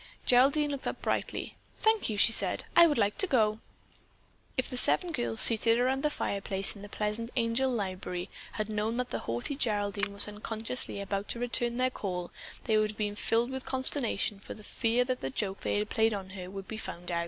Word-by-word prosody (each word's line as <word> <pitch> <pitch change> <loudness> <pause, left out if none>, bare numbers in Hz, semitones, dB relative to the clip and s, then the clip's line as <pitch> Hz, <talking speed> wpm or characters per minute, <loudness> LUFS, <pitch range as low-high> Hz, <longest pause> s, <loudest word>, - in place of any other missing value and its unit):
Geraldine 280 +4 +4
looked 280 -2 -4
up - - -3
brightly: - - -2 0.2
"Thank 440 - +2
you," 210 - -2
she 230 - +7
said, - - +1
"I 340 0 +9
would 295 - 0
like 205 -2 +1
to 390 - +5
go." 220 -7 +2 1.0
If 255 - 0
the - - -6
seven 345 +7 +3
girls 240 -6 +2
seated 230 0 +5
around 260 +2 +1
the 300 - +2
fireplace 195 -7 -2
in 200 - -11
the 205 - -9
pleasant 210 +3 -3
Angel 235 +2 +1
library 185 -5 -3 0.3
had 215 -1 -2
known 215 +2 -2
that 250 0 -2
the - - -2
haughty 120 - -2
Geraldine 205 -5 +1
was 200 +1 +2
unconsciously 220 +2 -3
about 200 0 -3
to 235 - -5
return 240 0 0
their 255 0 +2
call, 180 -6 -4 0.3
they 215 -1 +2
would 215 0 +1
have 210 - -8
been 205 -1 -2
filled 230 +4 0
with 265 -1 -4
consternation 260 -5 0
for - - -9
fear 230 +3 0
the 250 - -3
joke 195 +8 -2
they 205 +1 0
played 220 +1 +1
upon 190 -2 -6
her 185 -2 -7
would 195 0 -8
be 220 - -6
found 175 -4 -6
out. 170 - 0
220 Hz, 200 wpm, -30 LUFS, 200-250 Hz, 1.0 s, I